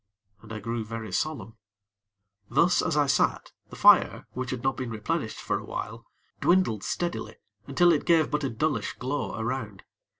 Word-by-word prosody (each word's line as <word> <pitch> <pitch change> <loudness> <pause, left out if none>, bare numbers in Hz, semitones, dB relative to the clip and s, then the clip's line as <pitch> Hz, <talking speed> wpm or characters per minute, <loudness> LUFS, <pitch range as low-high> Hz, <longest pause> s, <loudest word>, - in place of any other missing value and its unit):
And 110 - -13
I 110 - -4
grew 115 +2 -3
very 110 -1 -6
solemn. 115 -2 -3 0.9
Thus 170 +8 +3
as 160 -4 -1
I 145 - +4
sat, 135 - +1 0.2
the - - -10
fire, - - +5
which 130 0 -4
had 125 -2 -4
not 135 0 +1
been 130 -2 -4
replenished 110 -2 -3
for - - -1
a - - -10
while, - - -6 0.3
dwindled 175 - +2
steadily 175 0 -3 0.3
until 175 -1 +4
it 150 - -1
gave 165 -3 +3
but 150 0 0
a 135 - 0
dullish 145 +6 -1
glow 135 -1 -3
around. 110 -4 -4
130 Hz, 170 wpm, -27 LUFS, 110-155 Hz, 0.9 s, fire